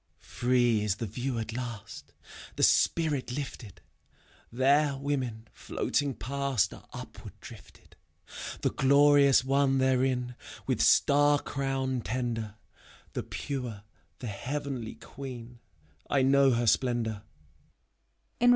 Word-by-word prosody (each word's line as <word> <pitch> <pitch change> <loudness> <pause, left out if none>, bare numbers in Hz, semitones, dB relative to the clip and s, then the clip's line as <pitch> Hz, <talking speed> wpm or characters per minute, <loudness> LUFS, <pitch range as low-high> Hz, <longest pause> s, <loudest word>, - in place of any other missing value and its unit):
Pree 120 -3 +1
is 105 -2 0
the 115 - -4
view 125 +4 -3
at 110 0 -4
last, 120 -3 -7 0.4
The - - -1
spirit 150 -7 +2
lifted: 125 -7 -6 0.7
There 140 +3 +3
women, 130 -5 -3
floating 140 -3 -2
past, 140 -3 -1
Are - - -14
upward - - -10
drifted: - - -14 0.7
The - - +1
Glorious 140 0 +5
One 135 0 +2
therein, 130 -1 +1 0.3
With - - 0
star 145 +1 +5
crown 135 -2 -2
tender, 115 -3 -3 0.3
— - - -24
The - - -2
pure, 125 -7 -5 0.3
the 125 - -8
Heavenly 130 +1 -4
Queen, 125 -1 -9 0.5
I 135 -2 +3
know 135 +1 +5
her 120 -1 +1
splendor. 115 -3 +1
130 Hz, 110 wpm, -29 LUFS, 120-140 Hz, 0.7 s, Glorious